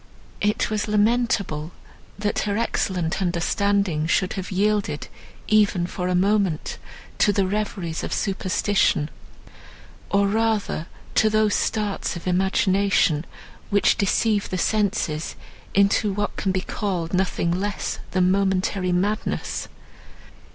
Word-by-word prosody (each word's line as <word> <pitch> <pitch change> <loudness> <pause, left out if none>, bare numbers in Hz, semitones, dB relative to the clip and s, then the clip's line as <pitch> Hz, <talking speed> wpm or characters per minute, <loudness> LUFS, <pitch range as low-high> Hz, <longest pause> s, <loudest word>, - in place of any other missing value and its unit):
It 210 +1 +1
was 215 0 -1
lamentable, 210 -7 +1 0.4
that 205 0 -1
her 205 -1 -1
excellent 190 -6 -1
understanding 180 -2 +1
should 185 +2 +1
have 190 -3 -5
yielded, 200 -5 0 0.4
even 205 -4 +3
for 180 0 -4
a 180 - +1
moment, 195 -3 +1 0.4
to 205 - +5
the 200 -1 +1
reveries 190 -4 -2
of - - -4
superstition, 190 -4 +1 1.0
or 200 0 +3
rather 215 -5 0 0.3
to 220 - +4
those 215 -1 +2
starts 210 -4 -1
of 170 - -8
imagination, 190 -3 +2 0.4
which 205 -1 +3
deceive 205 +1 +1
the 185 - -2
senses 190 -6 0 0.4
into 200 +1 +3
what 205 +1 -2
can 195 - -1
be 185 0 0
called 180 -4 -3
nothing 180 -2 +1
less 195 +3 -2
than 185 -1 +2
momentary 190 -1 +1
madness. 200 +5 -1
195 Hz, 115 wpm, -23 LUFS, 180-210 Hz, 1.0 s, to